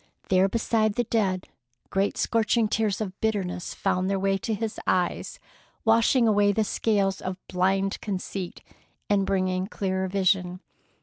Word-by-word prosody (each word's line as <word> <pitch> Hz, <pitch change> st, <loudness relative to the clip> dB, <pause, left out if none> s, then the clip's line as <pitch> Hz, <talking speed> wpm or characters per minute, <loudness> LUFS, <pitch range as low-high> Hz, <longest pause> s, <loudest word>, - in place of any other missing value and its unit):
There 190 Hz, +1 st, +4 dB
beside 220 Hz, -1 st, +1 dB
the 240 Hz, -, +1 dB
dead, 195 Hz, -5 st, 0 dB, 0.4 s
great 195 Hz, +1 st, 0 dB
scorching 230 Hz, 0 st, +2 dB
tears 215 Hz, -1 st, 0 dB
of 195 Hz, -4 st, -3 dB
bitterness 195 Hz, -5 st, -2 dB
found 185 Hz, +1 st, 0 dB
their 195 Hz, -, +1 dB
way 195 Hz, 0 st, +1 dB
to 220 Hz, +1 st, -2 dB
his 220 Hz, +1 st, -4 dB
eyes, 180 Hz, -, 0 dB, 0.5 s
washing 230 Hz, +2 st, +4 dB
away 205 Hz, -1 st, +4 dB
the 220 Hz, -, +2 dB
scales 200 Hz, -2 st, 0 dB
of 185 Hz, 0 st, -4 dB
blind 190 Hz, +2 st, 0 dB
conceit, 190 Hz, -2 st, -5 dB, 0.5 s
and 195 Hz, -2 st, +2 dB
bringing 185 Hz, -1 st, 0 dB
clearer 190 Hz, -2 st, -2 dB
vision. 185 Hz, -1 st, +1 dB
195 Hz, 140 wpm, -26 LUFS, 185-215 Hz, 0.5 s, There